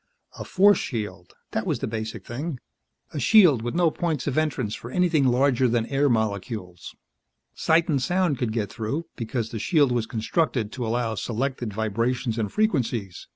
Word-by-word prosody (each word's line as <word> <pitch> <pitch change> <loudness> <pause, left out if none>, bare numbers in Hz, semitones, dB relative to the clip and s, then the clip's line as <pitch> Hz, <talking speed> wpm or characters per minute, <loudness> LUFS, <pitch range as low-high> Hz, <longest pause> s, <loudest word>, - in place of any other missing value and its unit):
A - - -4
force 200 +1 +4
shield, 105 -7 -5 0.2
that - - -2
was - - +1
the - - -3
basic 110 -2 -5
thing. 140 +3 -5 0.5
A 150 - -3
shield 165 - +6
with 120 +1 -4
no 170 -2 +3
points 160 -6 -2
of 140 - -1
entrance 140 -9 0
for 120 - -7
anything 165 -2 +2
larger 130 0 +3
than 115 -1 +1
air 140 +3 +1
molecules. 105 -5 -3 0.6
Sight 165 +1 +2
and 145 -6 +1
sound 180 -3 +1
could 120 -4 -1
get 110 -3 -2
through, 135 +9 -3
because 115 -1 -3
the 115 - -4
shield 145 - +3
was 120 -2 0
constructed 115 0 -1
to 125 -3 -4
allow 115 0 0
selected 120 +2 -3
vibrations 115 +3 -1
and 105 -3 -2
frequencies. 120 - -1
120 Hz, 170 wpm, -25 LUFS, 110-150 Hz, 0.6 s, shield